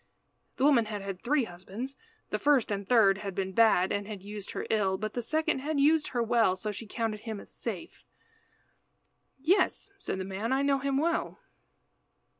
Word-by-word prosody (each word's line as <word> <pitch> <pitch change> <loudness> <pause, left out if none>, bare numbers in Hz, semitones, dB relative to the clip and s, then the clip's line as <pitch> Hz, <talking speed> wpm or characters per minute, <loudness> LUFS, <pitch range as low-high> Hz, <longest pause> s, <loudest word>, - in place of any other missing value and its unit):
The 260 - -2
woman 275 -6 +5
had 210 -2 -5
had 195 -2 -5
three 275 +2 +2
husbands. 210 +8 -7 0.4
The - - 0
first 280 -7 +3
and 200 -1 -3
third 200 -5 +5
had 195 -3 -5
been 190 -1 -2
bad 200 -4 +4
and 205 0 -2
had 205 -3 -7
used 205 0 -7
her - - -4
ill, 195 -4 +2
but 215 +2 -4
the 245 - -2
second 310 +4 0
had 290 +2 -1
used 300 +2 +4
her 240 -2 -1
well, 230 -5 +3
so 210 +3 -4
she 215 +2 -7
counted 220 -1 -2
him 220 -2 -6
as - - -13
safe. - - -6 1.3
"Yes," 360 +6 +1
said 375 - -3
the 190 - -4
man, 195 +5 -3
"I 270 +1 +2
know 280 -1 +2
him 275 0 0
well." 335 +4 0
225 Hz, 190 wpm, -29 LUFS, 200-275 Hz, 1.3 s, woman